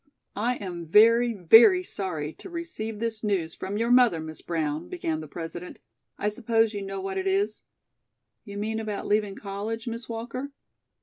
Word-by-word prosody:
"I 235 +5 0
am 175 -5 -6
very, 230 +6 +6
very 225 - +7
sorry 160 - -4
to - - -11
receive 325 -11 -5
this 225 0 -3
news 185 -6 0
from 195 +2 -4
your 230 +2 +1
mother, 245 -9 +5
Miss 155 0 -7
Brown," 160 -2 -2
began 160 - -2
the 155 - -8
President. 170 +3 -7 0.4
"I 210 - -1
suppose 225 0 +1
you 205 - -4
know 195 0 -5
what 190 0 -3
it 190 - -2
is?" 200 +3 0 0.8
"You 200 -2 -8
mean 220 +2 -2
about 215 -2 -4
leaving 205 -1 +1
college, 210 +3 -5
Miss 230 0 -5
Walker?" 235 +4 -5
210 Hz, 170 wpm, -26 LUFS, 185-230 Hz, 0.8 s, very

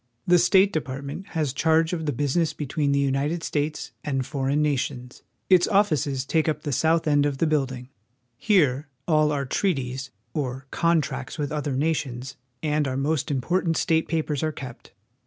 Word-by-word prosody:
The 175 0 +5
State 195 +3 +4
Department 140 +4 -4
has 150 -5 0
charge 160 +4 +2
of 160 -3 -3
the - - +2
business 145 +5 0
be 150 - -5
tween 145 +1 0
the 140 - +2
United 140 +4 0
States 150 +1 -2
and 135 -3 -1
foreign 140 +1 -1
nations. 130 -4 -2 0.3
Its 185 -2 +5
offices 155 - +1
take 160 +3 +1
up 150 -1 -2
the 145 - -2
south 160 +5 +2
end 145 -1 +4
of 145 -2 0
the 165 - +2
building. 135 -5 -1 0.5
Here 150 - +2 0.2
all 155 -2 +3
our 140 -2 -1
trea 185 +7 +1
ties, 130 +1 -5 0.2
or 135 -3 -3
contracts 170 -1 0
with 145 -2 -2
other 145 -3 -2
nations, 135 -4 -2 0.3
and 150 -1 +1
our 130 0 -2
most 140 0 0
important 165 +5 0
state 160 0 +1
pa 165 -2 +1
pers 150 -3 -3
are 155 - 0
kept. 130 -5 -10
150 Hz, 175 wpm, -25 LUFS, 135-160 Hz, 0.5 s, The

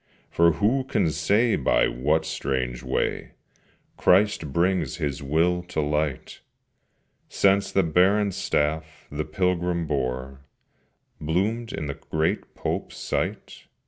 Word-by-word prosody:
For 85 0 +4
who 115 - +1
can 80 -10 +1
say 100 +10 +2
by - - +2
what 75 +6 0
strange 65 -5 -2
way, - - -2 0.6
Christ 90 -5 +3
brings 85 -1 +1
His 75 -5 -3
will 85 +5 +1
to 90 - -3
light, 75 -2 -2 0.9
Since 100 0 +2
the 95 - +3
barren 95 +5 +3
staff 80 -2 -2
the 75 +1 -3
pilgrim 90 0 0
bore 65 -2 -3 0.8
Bloomed 105 +9 -1
in 75 - -4
the 70 - -3 0.2
great 80 +1 -1
Pope's - - -4
sight? - - -4
80 Hz, 115 wpm, -25 LUFS, 75-95 Hz, 0.9 s, For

